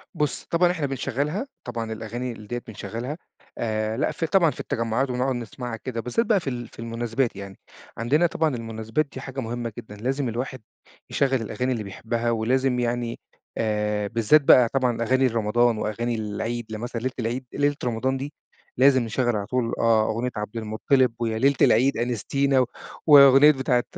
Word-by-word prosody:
بُص، 150 -5 -1
طبعًا 175 +1 +2
إحنا 165 -5 -2
بنشغِّلها، 140 - -2 0.2
طبعًا 115 -2 -4
الأغاني 120 +3 -5
ال 110 -2 -11
ديّة 120 +2 -4
بنشغِّلها 115 +6 -5 0.4
آآ، 110 -1 -1
لأ 140 - +1
في 165 - -3
طبعًا 170 -3 +4
في - - -13
التجمعات 115 +4 -1
ونقعُد 125 +1 0
نسمَعها 120 0 -6
كده، 115 0 -5
بالذات 125 - 0
بقى 215 -3 +3
في 150 - -4
ال 120 -2 -5
في - - -18
المناسبات 115 +2 -2
يعني. 100 -1 -9 0.4
عندنا 145 +10 +2
طبعًا 160 -4 0
المناسبات 115 +4 -2
دي 130 - -7
حاجة 135 0 -6
مهمة 120 -1 -4
جدًا، 110 -3 -9
لازم 130 +4 -2
الواحد 125 +2 -4 0.5
يشغِّل 135 -3 +1
الأغاني 125 +4 -2
اللي 115 -4 -2
بيحِبّها، 115 +4 -2
ولازم 125 +3 +1
يعني 120 -1 -2 0.4
آآ، 105 -1 0
بالذات 115 +7 +4
بقى 125 -3 +6
طبعًا 125 -4 +1
أغاني 130 +3 +3
لرمضان 115 0 +2
وأغاني 115 +3 -2
العيد. 110 +2 -3
لمثلًا 115 +2 -5
ليلة 130 +1 -2
العيد 120 +3 -2
ليلة 145 0 +1
رمضان 125 +3 0
دي 140 +3 -6 0.4
لازم 130 -1 +5
نشغِّل 120 +1 0
على 100 -1 -2
طول 120 +1 -1
آه، 110 -2 +3
أغنية 115 +3 -1
عبد 105 +1 -5
المطَّلب 115 +3 +1
ويا 115 -2 -1
ليلة 140 +4 +3
العيد 130 +5 +4
أنستِينا 130 +3 +1
و 130 - +3 0.4
وأغنية 140 0 +9
بتاعة 130 -3 +1
120 Hz, 175 wpm, -24 LUFS, 115-135 Hz, 0.5 s, وأغنية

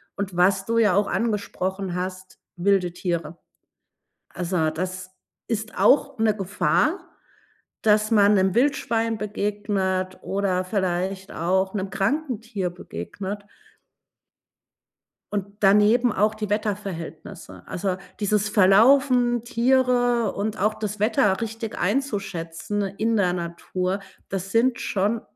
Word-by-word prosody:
Und 195 -3 -4
was 190 +2 +3
du 230 - +1
ja 210 -5 +4
auch 205 +1 +2
angesprochen 195 -4 -2
hast, 185 +1 -5 0.2
wilde 180 0 +2
Tiere. 170 -3 -3 0.9
Also, 170 -3 -1
das 185 +2 -5 0.4
ist 220 -1 -3
auch 280 -1 +4
'ne 220 -1 +2
Gefahr, 295 - 0 0.8
dass 215 0 +3
man 205 -2 +5
'nem 190 -1 +2
Wildschwein 230 -4 +1
begegnet 200 -3 -2
oder 190 -2 0
vielleicht 190 0 -2
auch 190 +4 0
'nem 195 -1 -3
kranken 245 +5 -1
Tier 200 -6 -3
begegnet. 190 - -7 1.9
Und 200 -2 -1
daneben 210 +4 +4
auch 210 +2 +2
die 215 -1 -4
Wetterverhältnisse. 200 -6 -5
Also, 185 0 -2 0.2
dieses 210 0 +1
Verlaufen, 240 +5 +4
Tiere 245 -1 +2
und 210 +2 -3
auch 210 +2 +2
das 210 -1 -5
Wetter 210 -2 +2
richtig 225 0 -5
einzuschätzen 200 -6 -2
in 215 +4 -1
der 180 -4 +2
Natur, 180 +2 -3 0.3
das 195 0 -4
sind 235 +2 +2
schon 210 +3 0
200 Hz, 115 wpm, -24 LUFS, 185-225 Hz, 1.9 s, man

